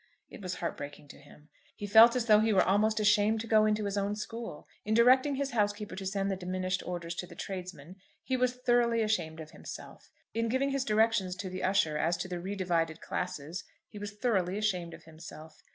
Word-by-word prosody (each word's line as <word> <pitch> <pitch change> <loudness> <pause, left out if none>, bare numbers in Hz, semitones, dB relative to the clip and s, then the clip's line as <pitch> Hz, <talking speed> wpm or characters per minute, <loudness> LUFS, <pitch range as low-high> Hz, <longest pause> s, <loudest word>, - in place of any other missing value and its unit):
It - - -10
was 185 -1 -4
heartbreaking 145 -3 -6
to - - -12
him. 150 +2 -18 0.3
He 205 - -6
felt 225 +4 +7
as 245 -2 0
though 215 -2 +6
he 220 +1 +2
were 190 - +5
almost 215 +3 +2
ashamed 210 +1 +3
to - - -6
go 215 -1 +4
into 210 0 0
his 200 0 -1
own 200 +1 -1
school. 225 -5 -7 0.2
In 215 +1 0
directing 260 +4 +5
his 275 0 -2
housekeeper 205 -2 -1
to 195 0 -5
send 195 0 -1
the - - 0
diminished 185 0 -2
orders 175 -1 -4
to 180 - -4
the 170 - -13
tradesmen 180 -3 -7 0.3
he 260 - -1
was 250 0 +1
thoroughly 235 -2 +3
ashamed 170 -7 -1
of 155 -1 -9
himself; - - -10 0.2
in 230 0 0
giving 265 +3 +1
his 275 -1 0
directions 215 -4 +2
to 185 0 -6
the 185 - -5
usher 185 -6 +1
as 165 +2 +1
to 180 +2 -4
the 180 -1 -4
re 190 +4 -4
divided 165 -4 -1
classes 180 -1 -4 0.3
he 210 - -10
was 205 0 -6
thoroughly 195 -5 0
ashamed 180 -6 -1
of - - -16
himself. 160 -1 -12
200 Hz, 215 wpm, -30 LUFS, 180-220 Hz, 0.3 s, felt